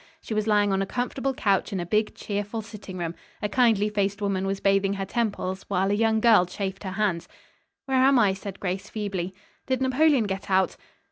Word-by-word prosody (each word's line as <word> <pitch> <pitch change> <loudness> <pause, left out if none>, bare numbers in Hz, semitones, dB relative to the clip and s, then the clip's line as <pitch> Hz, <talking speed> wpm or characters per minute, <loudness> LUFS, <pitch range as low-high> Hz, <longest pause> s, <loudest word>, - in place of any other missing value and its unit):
She 230 - -6
was 215 0 0
lying 205 -2 +3
on 195 - +1
a 195 - -1
comfortable 260 +3 -2
couch 200 -5 +1
in 195 - -2
a 175 - -3
big, 210 +4 0
cheerful 205 +2 -4
sitting 205 -3 -9
room. 170 -2 -3 0.3
A 210 - -1
kindly 220 -2 +3
faced 200 -1 -1
woman 195 -2 -1
was 195 0 -2
bathing 195 0 +2
her 195 -1 -3
temples, 200 -3 -2
while 195 0 +1
a - - +2
young 220 +1 +2
girl 220 -6 +5
chafed 195 +1 -5
her 190 -2 -4
hands. 195 -5 -1 0.6
"Where 265 -1 +2
am 270 0 +5
I?" 205 -5 +4
said 195 0 -8
Grace 190 0 -3
feebly. 190 -4 -4 0.3
"Did 260 -1 +1
Napoleon 265 0 +3
get 195 -1 -4
out?" 190 -2 +2
200 Hz, 205 wpm, -26 LUFS, 195-220 Hz, 0.6 s, girl